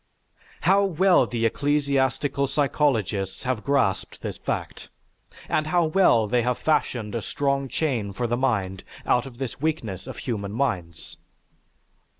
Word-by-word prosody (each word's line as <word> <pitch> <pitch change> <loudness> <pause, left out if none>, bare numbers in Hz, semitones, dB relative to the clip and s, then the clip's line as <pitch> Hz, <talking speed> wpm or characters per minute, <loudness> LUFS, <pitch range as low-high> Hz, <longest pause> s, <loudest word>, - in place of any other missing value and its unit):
How 195 +3 +4
well 185 -6 +4
the 115 -1 -1
ecclesiastical 140 +1 +1
psychologists 130 -9 0
have 125 -4 -2
grasped 100 -9 0
this - - -5
fact, - - -4 0.6
and 155 0 0
how 175 +1 +3
well 155 - +4
they 120 +3 +1
have 125 +1 0
fashioned 120 -8 0
a 115 - -2
strong 140 +3 -1
chain 125 -9 -1
for 120 +5 -3
the 120 +1 0
mind 100 -8 -1 0.2
out 125 +1 +2
of 120 -3 -12
this 130 -1 -5
weakness 115 - -2
of - - -7
human 100 -5 -4
minds! 95 - -3
130 Hz, 140 wpm, -25 LUFS, 110-145 Hz, 0.6 s, How